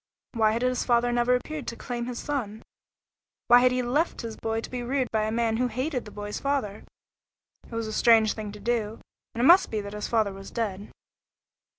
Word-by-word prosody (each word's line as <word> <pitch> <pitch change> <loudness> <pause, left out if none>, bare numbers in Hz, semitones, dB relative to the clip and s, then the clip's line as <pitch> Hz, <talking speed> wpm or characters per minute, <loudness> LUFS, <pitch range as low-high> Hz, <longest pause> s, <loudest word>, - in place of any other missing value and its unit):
Why 220 -2 +2
had 235 +2 -1
his 255 0 +1
father 240 0 +2
never 240 +1 +3
appeared 295 +2 -5
to 235 - -4
claim 240 0 -5
his 245 -1 -5
son? 230 -8 -4 0.9
Why 245 - +9
had 250 0 +4
he 250 0 0
left 290 +8 0
his 230 -2 -6
boy 225 0 -2
to - - -8
be 250 -1 -3
reared 255 +1 -1
by 215 -1 +1
a 215 - -2
man 225 -1 0
who 250 +1 +1
hated 255 +3 -3
the 210 - -10
boy's 205 0 -5
father? 270 -8 -2 0.8
It - - -20
was 230 0 -2
a 215 - -5
strange 220 -1 +5
thing 215 -2 -6
to 210 - -10
do, 220 0 -2 0.4
and 235 - -1
it - - +4
must 355 +5 +7
be 220 - -2
that 200 0 -8
his 210 0 -4
father 215 -4 +1
was 195 0 -10
dead. 205 -4 -4
235 Hz, 220 wpm, -26 LUFS, 215-250 Hz, 0.9 s, Why